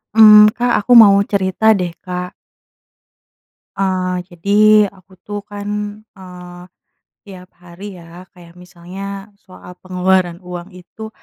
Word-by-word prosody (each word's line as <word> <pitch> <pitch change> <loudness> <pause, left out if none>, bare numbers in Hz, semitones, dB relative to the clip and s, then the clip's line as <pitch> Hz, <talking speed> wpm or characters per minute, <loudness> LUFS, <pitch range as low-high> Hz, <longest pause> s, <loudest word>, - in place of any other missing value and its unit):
Mmm, 210 -1 +8
Kak, 245 0 -1
aku 210 +4 -5
mau 210 -4 +8
cerita 200 +2 +1
deh, 180 -3 -3
Kak. 180 0 -7 1.4
Eee, 185 -1 -2 0.2
jadi 200 +4 -2 0.4
aku 185 0 -24
tuh 205 0 -6
kan, 205 0 -8 0.5
eee, 180 -1 -13 0.6
tiap 185 -2 -14
hari 180 +3 -12
ya, 170 +2 -14
kayak 175 -2 -17
misalnya 195 +3 -10
soal 185 -1 -15
pengeluaran 185 -1 -1
uang 180 0 -9
itu, 200 +5 -12
185 Hz, 120 wpm, -16 LUFS, 180-200 Hz, 1.4 s, Mmm